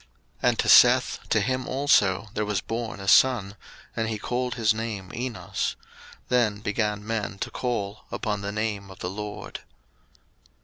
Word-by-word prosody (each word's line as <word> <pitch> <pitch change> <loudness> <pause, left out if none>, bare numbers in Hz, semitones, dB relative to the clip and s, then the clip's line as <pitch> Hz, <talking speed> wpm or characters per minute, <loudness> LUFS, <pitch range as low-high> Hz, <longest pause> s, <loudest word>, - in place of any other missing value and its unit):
01:004:026 - - -29 0.4
And - - -1
to - - +1
Seth, - - +6
to 110 - +3
him 130 +4 -1
also 115 -7 +2
there 105 - -1
was 105 -2 0
born 115 0 -4
a 95 - -7
son; 110 -4 +4 0.4
and 115 -1 -1
he 110 - -2
called 125 +3 -2
his 115 -3 +3
name 110 -4 -5
Enos: 100 -7 -3 0.5
then 115 -5 +2
began 105 0 -1
men 110 -3 -3
to - - -4
call 110 -5 -3
upon 105 -3 -3
the 100 0 -3
name 105 -2 -3
of 95 - -12
the 90 - -4
LORD. 105 +1 -6
105 Hz, 165 wpm, -26 LUFS, 100-115 Hz, 0.5 s, Seth